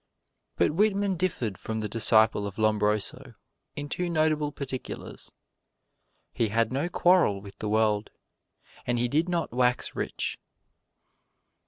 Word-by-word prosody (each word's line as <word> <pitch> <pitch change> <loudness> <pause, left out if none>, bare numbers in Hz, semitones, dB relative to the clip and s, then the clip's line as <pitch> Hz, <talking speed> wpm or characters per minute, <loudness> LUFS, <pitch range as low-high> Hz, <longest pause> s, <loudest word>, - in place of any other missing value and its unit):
But - - +2
Whitman 200 +2 +1
differed 145 - -2
from 110 0 -4
the 105 - -2
disciple 110 -1 +3
of 100 - -8
Lombroso 105 -1 0 0.4
in 145 0 -5
two 175 +4 -2
notable 155 -2 +1
particulars: 135 -3 -7 1.0
He 115 - +1
had 115 +2 +1
no 145 +6 -1
quarrel 175 - +3
with 100 0 -13
the 105 - -3
world, 110 -1 +1 0.8
and 120 0 +1
he 120 +1 +1
did 155 +8 +1
not 170 -8 -1
wax 125 0 +1
rich. - - -3
120 Hz, 130 wpm, -27 LUFS, 110-160 Hz, 1.0 s, disciple